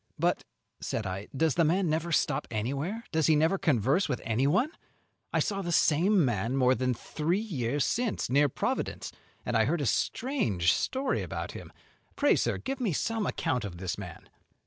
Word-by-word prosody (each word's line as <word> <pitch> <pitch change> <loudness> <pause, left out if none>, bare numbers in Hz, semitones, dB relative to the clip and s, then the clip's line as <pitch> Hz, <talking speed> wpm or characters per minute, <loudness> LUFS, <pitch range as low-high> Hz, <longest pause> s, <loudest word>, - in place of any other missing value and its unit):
"But," - - +1 0.4
said 110 - -3
I, 95 +2 -4
"does 160 0 +2
the 170 - +3
man 175 +4 +2
never 160 +2 -1
stop 150 -2 +1
anywhere, 140 - -3
does 160 -3 +2
he 160 - +5
never 160 +6 +2
converse 140 - +2
with 125 - -1
anyone? 140 - +2 0.6
I - - +1
saw 195 -2 -1
the 175 -2 -3
same 170 +3 +4
man 120 +2 -1
more 130 -1 +4
than 130 -1 0
three 160 - -1
years 145 - -1
since, 240 -3 -1
near 145 +3 +3
Providence, - - -2 0.3
and 120 - -1
I 110 -1 +4
heard 160 +7 0
a - - 0
strange 120 - +1
story 265 0 -1
about - - -5
him. - - -10 0.4
Pray, 290 - +4
sir, - - 0
give 270 0 -4
me 210 -8 +1
some 225 +6 -1
account 125 -2 -1
of 95 -4 -6
this 95 +2 -3
man." 90 -5 -9
150 Hz, 180 wpm, -29 LUFS, 120-190 Hz, 0.6 s, he